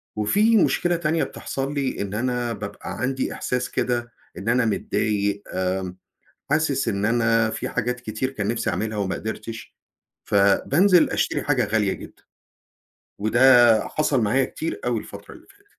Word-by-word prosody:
وفي 205 Hz, -, +3 dB
مشكلة 175 Hz, -2 st, +2 dB
تانية 165 Hz, -1 st, 0 dB
بتحصل 135 Hz, +1 st, -4 dB
لي، 135 Hz, -6 st, -2 dB
إن 100 Hz, -1 st, -4 dB
أنا 120 Hz, +1 st, -1 dB
بابقى 100 Hz, -1 st, -7 dB
عندي 130 Hz, +1 st, -1 dB
إحساس 125 Hz, 0 st, -2 dB
كده 120 Hz, -1 st, -2 dB, 0.3 s
إن 100 Hz, -, -3 dB
أنا 125 Hz, 0 st, +3 dB
متضايق، 100 Hz, -1 st, -1 dB
آمم 95 Hz, 0 st, -2 dB, 0.5 s
حاسس 150 Hz, -2 st, +1 dB
إن 100 Hz, 0 st, 0 dB
أنا 115 Hz, 0 st, +2 dB
في -, -, -4 dB
حاجات 125 Hz, 0 st, -2 dB
كتير 120 Hz, +2 st, -3 dB
كان 105 Hz, -7 st, -4 dB
نفْسي 115 Hz, +1 st, -1 dB
أعملها 105 Hz, +4 st, -2 dB
وما 100 Hz, -2 st, -1 dB
قدرتش، 110 Hz, +1 st, -7 dB, 0.5 s
فبانزل 140 Hz, -, +4 dB
أشتري -, -, 0 dB
حاجة 135 Hz, -6 st, +1 dB
غالية 105 Hz, -2 st, +1 dB
جدًا، -, -, -12 dB, 1.0 s
وده 120 Hz, 0 st, +5 dB
حصل 150 Hz, -4 st, 0 dB
معايا 125 Hz, +5 st, +2 dB
كتير 165 Hz, -, -5 dB
أوي 120 Hz, -2 st, 0 dB
الفترة 100 Hz, -1 st, -11 dB
اللي -, -, -17 dB
فاتت. 405 Hz, 0 st, -23 dB
120 Hz, 150 wpm, -23 LUFS, 105-135 Hz, 1.0 s, وده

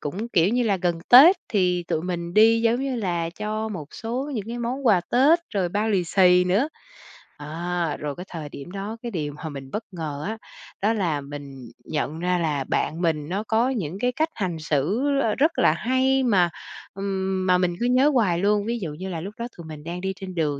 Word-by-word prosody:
cũng, 195 Hz, +11 st, -4 dB
kiểu 180 Hz, -5 st, +3 dB
như 245 Hz, +3 st, +1 dB
là, 210 Hz, -4 st, +2 dB
gần 175 Hz, -2 st, -1 dB
Tết 295 Hz, +10 st, +10 dB
thì 180 Hz, -6 st, +1 dB
tụi 155 Hz, -, -1 dB
mình 170 Hz, -1 st, -4 dB
đi, 225 Hz, +1 st, +6 dB
giống 230 Hz, +2 st, +2 dB
như 270 Hz, -2 st, -2 dB
là, 175 Hz, -6 st, -1 dB
cho 215 Hz, +4 st, -3 dB
một 180 Hz, -9 st, -6 dB
số 250 Hz, +6 st, -4 dB
những 215 Hz, -5 st, -3 dB
cái 240 Hz, +1 st, -4 dB
món 250 Hz, +3 st, -3 dB
quà 200 Hz, -6 st, +5 dB
Tết 280 Hz, +7 st, +5 dB, 0.2 s
rồi 190 Hz, -3 st, +1 dB
bao 205 Hz, +5 st, -1 dB
lì 190 Hz, -4 st, +1 dB
xì 180 Hz, 0 st, +4 dB
nữa. 200 Hz, +11 st, +2 dB, 0.7 s
À, 165 Hz, +1 st, -3 dB
rồi 145 Hz, -1 st, -4 dB
cái 180 Hz, -, -8 dB
thời 155 Hz, -4 st, -6 dB
điểm 140 Hz, +4 st, -9 dB
đó, 200 Hz, +3 st, -5 dB
cái 240 Hz, -, -4 dB
điều 150 Hz, -6 st, -3 dB
mà 155 Hz, +2 st, -7 dB
mình 135 Hz, -2 st, -9 dB
bất 215 Hz, -, -3 dB
ngờ 155 Hz, -5 st, -5 dB
á, 220 Hz, +1 st, -3 dB, 0.4 s
đó 210 Hz, +3 st, +2 dB
là 170 Hz, -9 st, -1 dB
mình 140 Hz, -3 st, -9 dB
nhận 155 Hz, +1 st, -3 dB
ra 180 Hz, +1 st, +1 dB
là 150 Hz, -5 st, -1 dB
bạn 160 Hz, +5 st, -1 dB
mình 155 Hz, -3 st, 0 dB
nó 195 Hz, +4 st, -2 dB
có 235 Hz, +2 st, +2 dB
những 190 Hz, -, -3 dB
cái 250 Hz, +3 st, +1 dB
cách 315 Hz, +5 st, 0 dB
hành 180 Hz, -6 st, -3 dB
xử, 155 Hz, -, 0 dB
ờ, 220 Hz, -4 st, +1 dB
rất 310 Hz, +5 st, +2 dB
là -, -, +5 dB
hay 260 Hz, +7 st, +1 dB
mà, 190 Hz, -8 st, +3 dB, 0.4 s
ừm, 190 Hz, -1 st, -2 dB
mà 180 Hz, 0 st, +5 dB
mình 180 Hz, -1 st, 0 dB
cứ 240 Hz, -, 0 dB
nhớ 255 Hz, +4 st, +4 dB
hoài 195 Hz, -9 st, +2 dB
luôn. 205 Hz, +2 st, +2 dB
Ví 235 Hz, +1 st, -2 dB
dụ 165 Hz, -7 st, -5 dB
như 185 Hz, +5 st, -6 dB
là 165 Hz, -3 st, -4 dB
lúc 195 Hz, +5 st, -7 dB
đó 235 Hz, -, -3 dB
tụi 170 Hz, -, -9 dB
mình 155 Hz, -2 st, -9 dB
đang 175 Hz, +3 st, -5 dB
đi 190 Hz, 0 st, -2 dB
trên 185 Hz, -1 st, -8 dB
đường 150 Hz, -4 st, 0 dB
185 Hz, 225 wpm, -24 LUFS, 165-225 Hz, 0.7 s, Tết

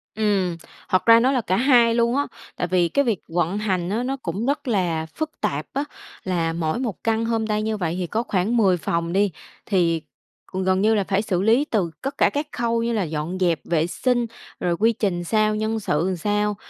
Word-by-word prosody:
Ừm, 195 Hz, -5 st, +1 dB, 0.3 s
thật 185 Hz, -, +2 dB
ra 230 Hz, 0 st, +8 dB
nó 255 Hz, +3 st, +3 dB
là 260 Hz, -3 st, +1 dB
cả 185 Hz, -, 0 dB
2 240 Hz, -3 st, +5 dB
luôn 235 Hz, +1 st, +2 dB
á, 285 Hz, +1 st, +1 dB, 0.3 s
tại 180 Hz, -, -2 dB
vì 180 Hz, -1 st, +2 dB
cái 280 Hz, 0 st, +2 dB
việc 220 Hz, -6 st, 0 dB
vận 175 Hz, +3 st, 0 dB
hành 185 Hz, -4 st, -1 dB
á 225 Hz, +4 st, -1 dB
nó 270 Hz, +2 st, -2 dB
cũng 200 Hz, -2 st, -4 dB
rất 280 Hz, +1 st, -1 dB
là 175 Hz, -8 st, 0 dB
phức 315 Hz, 0 st, -3 dB
tạp 145 Hz, +2 st, -1 dB
á, 280 Hz, -, 0 dB, 0.4 s
là 170 Hz, -3 st, 0 dB
mỗi 165 Hz, +4 st, -1 dB
một 235 Hz, -6 st, -4 dB
căn 225 Hz, 0 st, +1 dB
homestay 220 Hz, -2 st, 0 dB
như 215 Hz, 0 st, -1 dB
vậy 175 Hz, -3 st, -2 dB
thì 180 Hz, -, -2 dB
có 225 Hz, +7 st, -1 dB
khoảng 205 Hz, +3 st, 0 dB
10 190 Hz, -5 st, +4 dB
phòng 170 Hz, 0 st, -2 dB
đi, 200 Hz, 0 st, +2 dB, 0.3 s
thì 170 Hz, -5 st, +2 dB
c 155 Hz, -, -28 dB, 0.6 s
gần 190 Hz, 0 st, +2 dB
như 220 Hz, +2 st, +4 dB
là 205 Hz, -, +2 dB
phải 195 Hz, +1 st, 0 dB
xử 190 Hz, -5 st, -1 dB
lý 230 Hz, +8 st, +3 dB
từ 195 Hz, -, -1 dB
cất 275 Hz, +1 st, -4 dB
cả -, -, +4 dB
các 290 Hz, +1 st, -3 dB
khâu 230 Hz, -1 st, 0 dB
như 235 Hz, 0 st, 0 dB
là 215 Hz, -3 st, +1 dB
dọn 160 Hz, +2 st, -3 dB
dẹp 175 Hz, -3 st, +2 dB
vệ 165 Hz, -1 st, +1 dB
sinh, 240 Hz, +5 st, 0 dB, 0.3 s
rồi 175 Hz, -1 st, 0 dB
quy 225 Hz, +2 st, +4 dB
trình 190 Hz, -5 st, -1 dB
sao, 215 Hz, +3 st, +2 dB
nhân 220 Hz, +1 st, -1 dB
sự 150 Hz, -7 st, 0 dB
làm 185 Hz, +2 st, 0 dB
sao. 210 Hz, +3 st, 0 dB
205 Hz, 225 wpm, -23 LUFS, 175-230 Hz, 0.6 s, ra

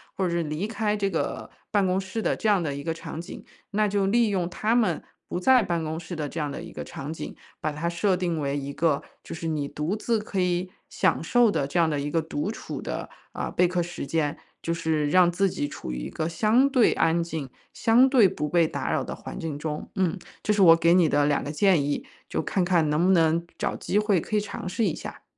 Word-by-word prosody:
或 190 Hz, -, 0 dB
者 -, -, 0 dB
是 170 Hz, 0 st, 0 dB
离 155 Hz, +5 st, -3 dB
开 220 Hz, -1 st, -1 dB
这 200 Hz, -1 st, 0 dB
个 165 Hz, -, -3 dB, 0.2 s
办 205 Hz, -2 st, +2 dB
公 185 Hz, 0 st, +1 dB
室 195 Hz, +4 st, -4 dB
的 -, -, +1 dB
这 -, -, -2 dB
样 200 Hz, -4 st, +3 dB
的 145 Hz, -3 st, -2 dB
一 140 Hz, -, -5 dB
个 165 Hz, +1 st, -1 dB
场 165 Hz, -1 st, -7 dB
景， 170 Hz, -, -8 dB, 0.3 s
那 210 Hz, +1 st, +2 dB
就 200 Hz, -1 st, +1 dB
利 230 Hz, +2 st, +3 dB
用 185 Hz, -4 st, -1 dB
他 210 Hz, +5 st, 0 dB
们 235 Hz, -3 st, +2 dB, 0.2 s
不 -, -, -3 dB
在 255 Hz, +7 st, +5 dB
办 170 Hz, -5 st, -1 dB
公 160 Hz, +1 st, -3 dB
室 175 Hz, +1 st, -7 dB
的 150 Hz, -2 st, -3 dB
这 165 Hz, -, -5 dB
样 150 Hz, -1 st, -1 dB
的 140 Hz, -, -6 dB
一 -, -, -9 dB
个 -, -, -7 dB
场 140 Hz, +2 st, -6 dB
景， 160 Hz, -, -6 dB, 0.2 s
把 155 Hz, -, -2 dB
它 160 Hz, +3 st, -2 dB
设 185 Hz, +3 st, +1 dB
定 175 Hz, -3 st, -1 dB
为 140 Hz, -1 st, -1 dB
一 140 Hz, 0 st, -4 dB
个 155 Hz, -1 st, +1 dB, 0.2 s
就 -, -, -8 dB
是 165 Hz, 0 st, -5 dB
你 150 Hz, -3 st, -1 dB
独 155 Hz, +9 st, -2 dB
自 230 Hz, +1 st, 0 dB
可 210 Hz, -2 st, -3 dB
以 180 Hz, 0 st, 0 dB, 0.2 s
享 -, -, +1 dB
受 240 Hz, -3 st, +4 dB
的 140 Hz, -8 st, 0 dB
这 140 Hz, -, -3 dB
样 165 Hz, -2 st, +4 dB
的 150 Hz, -2 st, -1 dB
一 145 Hz, +1 st, -2 dB
个 165 Hz, +2 st, +1 dB
独 160 Hz, +2 st, -3 dB
处 225 Hz, -, -6 dB
的， -, -, -5 dB, 0.2 s
呃， -, -, -3 dB
备 180 Hz, -, +3 dB
课 180 Hz, 0 st, 0 dB
时 175 Hz, -3 st, -5 dB
间， 150 Hz, 0 st, 0 dB, 0.2 s
就 165 Hz, -, -1 dB
是 160 Hz, -3 st, 0 dB
让 180 Hz, +1 st, +5 dB
自 195 Hz, +3 st, +2 dB
己 145 Hz, -, -2 dB
处 65 Hz, -, -7 dB
于 60 Hz, -, -4 dB
一 -, -, -5 dB
个 155 Hz, -, -3 dB
相 220 Hz, +11 st, +3 dB
对 255 Hz, -5 st, +4 dB
安 165 Hz, +1 st, +2 dB
静、 160 Hz, -5 st, -5 dB, 0.2 s
相 235 Hz, +3 st, +5 dB
对 250 Hz, -7 st, +6 dB
不 150 Hz, -5 st, -3 dB
被 170 Hz, 0 st, +3 dB
打 -, -, -3 dB
扰 -, -, +1 dB
的 -, -, -5 dB
环 -, -, -8 dB
境 155 Hz, -3 st, -4 dB
中。 150 Hz, 0 st, -5 dB
嗯， 190 Hz, -2 st, +1 dB, 0.3 s
这 -, -, +1 dB
是 205 Hz, -, +2 dB
我 165 Hz, -3 st, +9 dB
给 170 Hz, +1 st, +4 dB
你 175 Hz, -2 st, +5 dB
的 145 Hz, 0 st, +3 dB
2 145 Hz, -1 st, +1 dB
个 145 Hz, -, -4 dB
建 175 Hz, -1 st, +3 dB
议， 145 Hz, 0 st, -2 dB, 0.2 s
就 -, -, -1 dB
看 190 Hz, -, 0 dB
看 170 Hz, -4 st, +2 dB
能 155 Hz, +3 st, +2 dB
不 190 Hz, -, +4 dB
能 165 Hz, -1 st, +3 dB
找 -, -, -1 dB
机 200 Hz, -, -1 dB
会 210 Hz, -3 st, +3 dB
可 215 Hz, -, -4 dB
以 -, -, +4 dB
尝 205 Hz, -, -6 dB
试 205 Hz, +5 st, 0 dB
一 175 Hz, -, +1 dB
下。 -, -, -9 dB
170 Hz, 270 characters per minute, -26 LUFS, 155-200 Hz, 0.3 s, 我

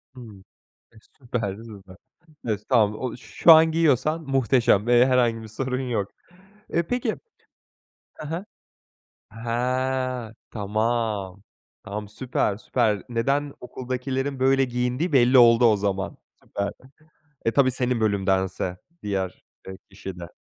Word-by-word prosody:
Hımm. 110 Hz, -6 st, -12 dB, 0.5 s
E, -, -, -24 dB, 0.2 s
süper 115 Hz, -6 st, -3 dB
süper. 100 Hz, -4 st, -12 dB, 0.5 s
Estağfu 105 Hz, 0 st, +1 dB
o 125 Hz, -1 st, -4 dB
şu 165 Hz, +6 st, +4 dB
an 160 Hz, 0 st, +7 dB
giyiyorsan 160 Hz, 0 st, +2 dB
muhteşem 125 Hz, -5 st, +2 dB
ve 120 Hz, +1 st, +6 dB
herhangi 120 Hz, -3 st, +2 dB
bir 110 Hz, -, -9 dB
sorun 130 Hz, +4 st, -3 dB
yok. 105 Hz, -4 st, -2 dB, 0.6 s
Eee, 170 Hz, -, +2 dB
peki 240 Hz, +4 st, -2 dB, 1.0 s
He 150 Hz, -, -6 dB
he. 170 Hz, +6 st, -4 dB, 0.9 s
He, 125 Hz, +1 st, -2 dB, 0.2 s
tamam, 105 Hz, -2 st, -2 dB, 0.4 s
tam 105 Hz, +1 st, -6 dB
süper, 105 Hz, -3 st, -1 dB
süper. 110 Hz, -3 st, 0 dB
Neden 140 Hz, +5 st, 0 dB
okuldakilerin 130 Hz, +2 st, -4 dB
böyle 135 Hz, 0 st, +4 dB
giyindiği 125 Hz, +6 st, -1 dB
belli 130 Hz, 0 st, +5 dB
oldu 120 Hz, 0 st, +7 dB
o 110 Hz, -2 st, +5 dB
zaman. 100 Hz, 0 st, -2 dB, 0.3 s
Süper, 100 Hz, 0 st, -3 dB, 0.7 s
e, 115 Hz, -, +1 dB
tabii 135 Hz, -2 st, +4 dB
senin 125 Hz, -1 st, -1 dB
bölümdense 95 Hz, -3 st, 0 dB, 0.3 s
diğer, 95 Hz, -3 st, -3 dB, 0.2 s
eee, 95 Hz, -, -8 dB
kişi 95 Hz, -1 st, -8 dB
de. 85 Hz, -, -7 dB
120 Hz, 120 wpm, -24 LUFS, 105-130 Hz, 1.0 s, an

